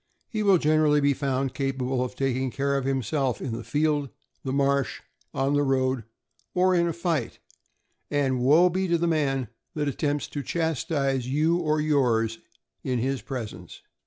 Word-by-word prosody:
He 215 - -3
will 200 -3 +5
generally 155 -1 +3
be 140 0 +3
found 135 -1 -1
capable 135 -1 -1
of 125 - -5
taking 130 -1 0
care 140 +2 -1
of 135 -1 -1
himself 135 -2 0
in 120 -4 -3
the 115 - -6
field, 145 +3 0 0.3
the 130 - -2
marsh, 140 0 +1 0.3
on 135 +1 0
the 145 - +3
road, 130 -3 +1 0.5
or 185 +1 +4
in 170 -1 +3
a - - 0
fight; 165 -7 -2 0.7
and 135 -3 +1
woe 150 +8 +5
be 190 +2 -1
to 170 -1 +2
the 170 - 0
man 135 -7 0 0.3
that 150 -1 -1
attempts 145 +1 -1
to 145 - -4
chas 160 -2 -1
tise 135 -5 0
you 155 +5 +2
or 155 -3 +1
yours 120 -7 +1 0.4
in 130 -2 -1
his 130 +1 -1
presence. 120 -2 -7
140 Hz, 170 wpm, -26 LUFS, 130-155 Hz, 0.7 s, will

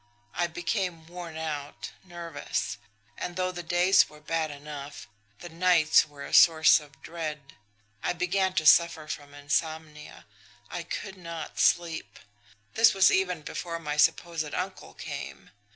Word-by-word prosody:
I 175 0 0
became 175 0 -3
worn 170 -1 -8
out, 150 -3 -5
nervous; 175 -2 -4 0.4
and 175 - -4
though 185 0 -1
the 175 -1 -6
days 175 +3 +4
were 150 - -15
bad 160 +1 -2
enough, 145 0 -8 0.3
the 175 - -8
nights 170 -2 +4
were 145 -1 -10
a - - -9
source 160 -1 +7
of 145 -3 -17
dread. 155 -4 -6 0.5
I - - 0
began 185 +1 0
to 160 -4 0
suffer 165 0 +5
from 145 -2 -7
insomnia 150 +2 -3 0.5
I - - -4
could 195 -1 -6
not 170 -3 -7
sleep. 170 -2 +1 0.6
This 225 -2 +5
was 190 -1 +6
even 180 -4 0
before 170 +1 -5
my 150 -3 -4
supposed 155 0 +1
uncle 185 +1 -5
came. - - -8
165 Hz, 140 wpm, -28 LUFS, 150-175 Hz, 0.6 s, source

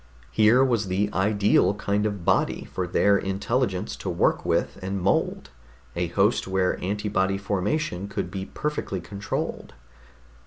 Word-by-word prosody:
Here 115 +5 +5
was 115 -6 +1
the 100 +3 0
ideal 100 0 +3
kind 105 +1 0
of 100 -5 -5
body - - +2
for 90 -1 -4
their 100 +3 +3
intelligence 100 +1 -1
to 95 - -5
work 85 - +1
with - - 0
and 95 +1 -3
mold, 95 +2 0 0.4
a 85 0 0
host 100 +6 +1
where 95 -1 0
antibody 95 -1 0
formation 100 - -1
could 100 - -4
be 95 -1 -5
perfectly 150 -10 -3
controlled. 100 -6 -5
100 Hz, 140 wpm, -25 LUFS, 95-105 Hz, 0.4 s, Here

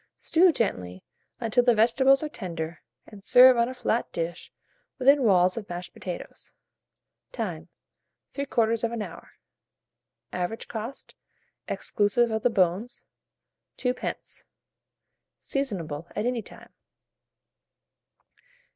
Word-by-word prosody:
Stew 350 +2 +4
gently, 90 - -2 0.4
until 240 +1 +2
the 240 -1 +4
vegetables 265 +5 +4
are - - -1
tender, 170 - -6 0.2
and 200 -2 -14
serve 255 +3 +8
on 235 +1 +2
a 255 - -7
flat 240 -2 -1
dish 170 +1 -4 0.5
within 275 +2 +5
walls 185 -4 +4
of 210 -3 -6
mashed 175 0 -6
potatoes. 180 -2 -8 0.8
Time. - - -5 0.6
3/4 230 -4 0
hour. - - -11 1.0
Average 180 +5 -3
cost, 230 +4 -6 0.5
exclusive 220 +3 +1
of 220 0 -1
the 245 - +3
bones, 200 +3 0 0.7
2d. 250 -1 -3 0.9
Seasonable 175 - -3
at 215 - -1
any 245 -1 0
time. - - -15
225 Hz, 100 wpm, -26 LUFS, 180-250 Hz, 1.0 s, serve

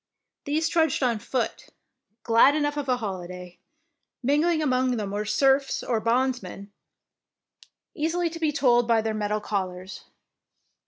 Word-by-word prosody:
These 310 +3 0
trudged 320 -4 +1
on 235 -3 +1
foot, 245 +3 -3 0.6
glad 230 +5 +5
enough 290 -1 0
of 290 -2 -4
a 250 - +2
holiday. 180 -4 -7 0.6
Mingling 310 +5 +2
among 255 -3 +1
them 205 -2 -3
were 205 +1 -2
serfs 270 +5 +2
or 235 -3 0
bondsmen, 230 -4 -1 1.2
easily 330 +2 -1
to 330 - -7
be 315 -2 +1
told 240 -4 +3
by 230 -1 +3
their 220 0 -1
metal 210 0 -1
collars. 190 -2 -5
245 Hz, 130 wpm, -25 LUFS, 210-290 Hz, 1.2 s, glad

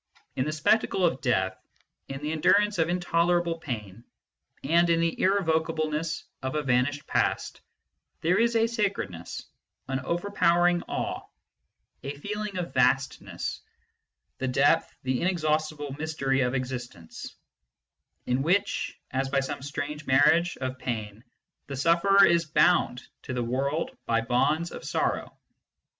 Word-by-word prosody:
In 130 - 0
the 155 - -1
spectacle 180 +4 +2
of 150 -6 0
Death, 95 -7 +1 0.5
in 135 +1 -7
the 150 - -1
endurance 205 +5 +3
of 165 +1 +2
intolerable 175 -1 +1
pain, 110 -7 -6 0.6
and 170 +1 +3
in 165 0 +3
the 165 0 0
irrevocable 160 -5 +1
ness 155 +1 -2 0.2
of 130 +2 -3
a 150 - 0
vanished 135 +2 +1
past, - - -1 0.6
there 175 +3 +2
is 235 0 +2
a 225 0 +4
sacredness, 200 - -3 0.4
an 135 0 -1
over 175 +8 -3
powering 175 -2 +3
awe, - - -3 0.8
a 140 +1 -5
feeling 210 +4 -4
of 180 - -1
the - - -15
vastness, 135 +1 0 0.8
the 130 - -1
depth, 140 +5 +3
the 130 -1 -1
inexhaustible 155 -4 -1
mystery 140 -4 0
of 125 +1 0
existence, 125 -10 -6 0.9
in 125 +1 0
which, 190 +7 0
as 135 0 -1
by 135 0 +2
some 135 -1 -4
strange 145 +2 -5
marriage 160 +6 +4
of 130 -1 -4
pain, 110 -3 -4 0.4
the 140 - -5
sufferer 170 +7 +5
is 170 -1 +3
bound 155 -5 +2 0.2
to - - -6
the 120 - -1
world 140 +6 -1
by 115 0 +2
bonds 150 +8 +1
of - - -8
sorrow. - - -2
155 Hz, 140 wpm, -27 LUFS, 130-170 Hz, 0.9 s, sufferer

